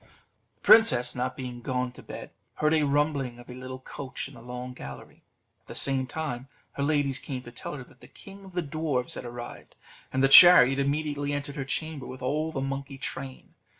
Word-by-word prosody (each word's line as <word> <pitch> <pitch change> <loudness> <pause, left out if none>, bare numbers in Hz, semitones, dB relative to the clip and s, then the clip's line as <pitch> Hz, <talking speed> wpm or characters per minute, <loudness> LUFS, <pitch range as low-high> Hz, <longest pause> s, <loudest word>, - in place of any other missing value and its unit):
The - - -42
princess 125 - +6
not 125 0 -3
being 125 -2 -6
gone 125 0 -2
to 125 - -13
bed, - - -9 0.2
heard 150 +1 +2
a 160 - +3
rumbling 145 -3 0
of 120 +1 -12
a - - -7
little 130 +1 -7
coach 130 0 -7
in 140 - -14
the 120 - -13
long 125 +1 -7
gallery; 70 - -10 0.4
at - - -42
the - - -8
same 135 -1 +1
time, 135 -4 -4 0.2
her - - -6
ladies 140 -2 +1
came 130 -2 -6
to 120 - -11
tell 120 - -6
her 135 - -7
that - - -21
the - - -13
king 195 0 -13
of 190 -1 -13
the 175 -1 -1
dwarfs 145 -4 -2
was - - -6
arrived, 120 0 -9 0.4
and 130 +1 +1
the - - +7
chariot 135 -3 +9
immediately 145 0 -1
entered 145 0 -4
her 135 -3 -4
chamber 155 -1 -4
with 130 0 -9
all 155 +5 -1
the 135 - -3
monkey 135 0 -4
train. 130 0 -7
135 Hz, 210 wpm, -27 LUFS, 125-145 Hz, 0.4 s, chariot